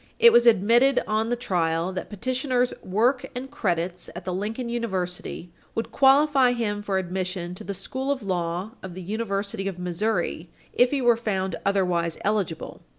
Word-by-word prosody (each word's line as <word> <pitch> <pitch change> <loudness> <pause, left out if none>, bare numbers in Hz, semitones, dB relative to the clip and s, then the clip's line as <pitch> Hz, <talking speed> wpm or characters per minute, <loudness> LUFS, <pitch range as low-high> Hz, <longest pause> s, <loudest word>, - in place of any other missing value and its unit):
It 470 - +7
was 240 0 +6
admitted 235 +5 +5
on 220 +1 0
the 240 - +1
trial 175 -5 0
that 185 - -5
petitioner's 250 +3 0
"work 240 +7 +1
and 265 +2 -6
credits 180 - -2
at - - -7
the 185 - -2
Lincoln 220 +6 -3
University 185 -7 -3 0.2
would 225 - -3
qualify 270 -2 +5
him 210 -4 -2
for 200 -2 -1
admission 185 -1 -3
to 180 - -8
the 200 +1 -4
School 260 +8 -4
of 275 -5 -1
Law 180 +1 -2
of 185 -2 -8
the 185 - -7
University 200 0 -3
of 190 -2 -4
Missouri 180 -1 -2 0.2
if 245 +1 +4
he 275 -1 -1
were 240 -1 +5
found 190 -5 -1
otherwise 180 -4 +1
eligible." 200 -6 -2
205 Hz, 165 wpm, -25 LUFS, 180-240 Hz, 0.2 s, It